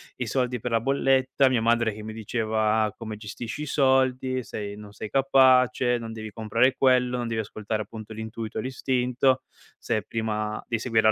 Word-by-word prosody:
i 125 - -3
soldi 125 +1 -1
per 120 +1 -4
la 115 -1 +2
bolletta, 135 0 +2
mia 125 -3 +1
madre 115 -1 +2
che 105 - -9
mi 110 0 -7
diceva: 110 -1 0
"Come 110 -2 -6
gestisci 110 +5 -7
i 150 - -3
soldi, 130 -2 +2
sei 105 -2 -6
non 105 0 -11
sei 105 +1 -8
capace, 130 -2 +4
non 115 -1 -6
devi 110 -1 -7
comprare 115 +4 +2
quello, 125 -2 +3
non 120 -1 -2
devi 115 -1 -1
ascoltare 110 0 -4
appunto 110 0 -10
l'intuito, 110 0 -5
l'istinto, 130 0 0 0.3
se - - -1
è 110 - -1
prima 110 0 -3
di 115 -2 -1
seguire 110 -2 +3
115 Hz, 180 wpm, -26 LUFS, 110-130 Hz, 0.3 s, capace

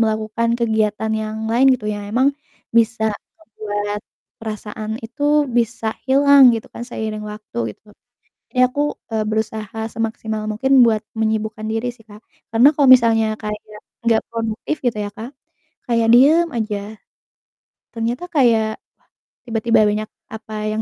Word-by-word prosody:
melakukan 220 +1 0
kegiatan 220 -2 0
yang 215 0 -3
lain 245 +4 +4
gitu, 230 - -8
yang 205 -1 -5
emang 250 +6 +3 0.4
bisa 225 -1 +2 0.3
ngebuat 205 -7 -4 0.4
perasaan 215 -1 -6
itu 245 +6 -8 0.3
bisa 235 -1 -1 0.2
hilang 280 +1 +6
gitu 225 - -5
kan, - - -7
seiring 215 -2 -4
waktu 210 - -8 0.2
gitu. 210 - -22 0.6
Jadi 255 - -1
aku, 255 +3 -4 0.3
eee, 220 -1 0
berusaha 220 0 -3
semaksimal 220 -1 -3
mungkin 265 +6 0
buat 220 -2 +1 0.2
menyibukkan 220 0 -1
diri 225 +2 -1
sih 225 -2 -22
Kak, 210 +1 -14 0.3
karena 240 +5 +7
kalau 285 -1 +3
misalnya 225 -2 +3
kayak 210 -1 -4 0.5
gak 225 -1 +3
produktif, 230 +5 -3
gitu 230 -3 0
ya 205 - -5
Kak, 230 +3 -7 0.6
kayak 230 -1 +2
diem 305 +7 +6
aja, 215 -2 -1 1.2
ternyata 235 +7 -2
kayak 230 -7 +2
wah - - -64 0.5
tiba-tiba 230 0 +2
banyak, 215 +1 -2 0.2
apa 220 0 -9 0.2
yang 220 - -1
220 Hz, 140 wpm, -20 LUFS, 215-235 Hz, 1.2 s, karena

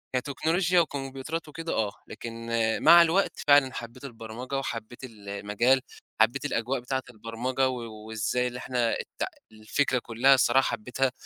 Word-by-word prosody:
كتكنولوجيا 165 +7 +1
وكمبيوترات 140 +1 -3
وكده 165 +2 -5
آه، 105 -2 0 0.2
لكن 115 0 -8 0.3
مع 170 0 +9
الوقت 170 +4 +3 0.2
فعلًا 140 -2 +5
حبّيت 120 +4 -8
البرمجة 120 +1 -6
وحبّيت 120 -1 -5
ال 105 -5 -10
المجال 105 +6 +2 0.4
وحبّيت 130 +6 +2
الأجواء 125 -1 -1
بتاعة 130 +2 -3
البرمجة 120 +4 -2
و 125 -2 -4 0.3
وإزاي 110 +3 -1
اللي 125 0 -6
إحنا 120 -3 0
الت - - -5 0.3
الفكرة 120 +4 0
كلّها 120 +4 +3
الصراحة 130 0 +3
حبّيتها، 125 +4 -1
125 Hz, 140 wpm, -27 LUFS, 115-135 Hz, 0.4 s, مع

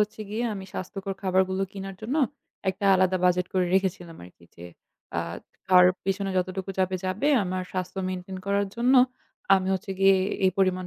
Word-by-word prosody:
হচ্ছে 210 +1 -1
গিয়ে 230 +3 -2
আমি 190 -1 -7
স্বাস্থ্যকর 195 +1 -5
খাবারগুলো 190 0 +1
কিনার 195 -1 -7
জন্য, 255 +8 -2 0.5
একটা 195 +2 -7
আলাদা 185 0 +3
বাজেট 180 0 +3
করে 180 -1 +2
রেখেছিলাম 180 -3 -1
আরকি। 90 -1 -17
যে 85 - -10 0.5
আ - - +1 0.5
খাওয়ার 180 -1 +7 0.2
পিছনে 195 0 -1
যতটুকু 185 +1 -2
যাবে, 185 0 +1
যাবে, 200 +11 0 0.2
আমার 185 0 -2
স্বাস্থ্য 185 +1 -4
maintain 185 +1 -5
করার 200 0 +1
জন্য, 250 +3 +3 0.6
আমি 190 -1 0
হচ্ছে 195 +1 -5
গিয়ে 195 0 +6 0.3
এই 185 - +5
পরিমাণ 185 -1 +1
190 Hz, 165 wpm, -26 LUFS, 185-195 Hz, 0.6 s, খাওয়ার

